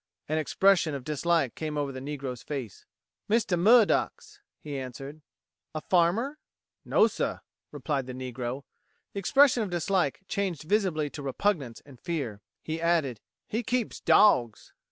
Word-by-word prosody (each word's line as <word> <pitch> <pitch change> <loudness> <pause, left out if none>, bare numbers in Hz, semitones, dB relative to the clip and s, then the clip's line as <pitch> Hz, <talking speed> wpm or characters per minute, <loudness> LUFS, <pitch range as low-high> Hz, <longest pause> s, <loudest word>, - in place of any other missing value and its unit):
An 155 +1 0
expression 170 +1 +3
of 135 - -6
dislike 155 -1 0
came 155 -1 -4
over 145 -1 -1
the 130 - -7
negro's 135 -3 -5
face. 130 -8 -6 0.4
"Mistah 215 -4 +2
Murdock's," 230 - +3 0.2
he 145 -2 -7
answered. 135 +3 -7 0.5
"A 155 - -2
farmer?" 195 - +1 0.4
"No, - - +4
suh," - - -2 0.3
replied 140 -4 -2
the 130 - -6
negro. 130 +1 -5 0.5
The 200 - -3
expression 265 +4 +4
of 210 - -2
dislike 175 -2 0
changed 190 -7 -2
visibly 165 -5 0
to 145 - -7
repugnance 140 - -1
and 135 -4 -15
fear. 140 - -4 0.2
He 160 +1 -4
added: 160 -9 +1 0.3
"He 225 - -1
keeps 245 -1 -2
dawgs!" 120 - +3
155 Hz, 140 wpm, -28 LUFS, 135-195 Hz, 0.5 s, No